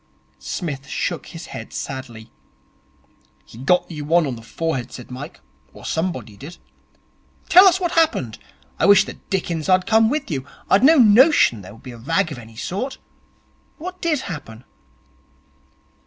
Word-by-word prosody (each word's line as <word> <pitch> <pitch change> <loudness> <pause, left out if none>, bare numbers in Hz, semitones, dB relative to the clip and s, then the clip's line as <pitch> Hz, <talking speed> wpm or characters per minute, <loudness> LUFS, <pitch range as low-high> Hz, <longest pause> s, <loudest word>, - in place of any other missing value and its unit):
Psmith 140 -6 -5
shook 175 +2 -3
his 165 +1 -9
head 110 - -8
sadly. 120 -4 -7 1.1
'He 115 - -14
got 180 +7 +1
you 150 -2 -6
one 165 +2 +3
on 130 -3 -3
the 115 - -11
forehead,' 130 0 -3
said 120 0 -10
Mike, 130 - -8 0.3
'or - - -13
somebody 160 - -3
did. 150 - -11 0.9
Tell 380 +1 +9
us 370 0 +4
what 350 -2 -1
happened. 315 - +1 0.4
I - - +3
wish 200 -1 +7
the - - -7
dickens 175 -4 -3
I'd 185 0 +4
come 220 0 +4
with 285 - -2
you. 135 -4 -2 0.3
I'd 200 - +5
no 315 +4 +7
notion 235 - +5
there 95 +2 -12
would 115 - -19
be 130 - -8
a 120 - -11
rag 165 +6 0
of 135 - -7
any 115 -1 -13
sort. 200 - -4 0.8
What 365 +3 -8
did 315 -5 0
happen?' 130 - -8
165 Hz, 160 wpm, -21 LUFS, -, 1.1 s, Tell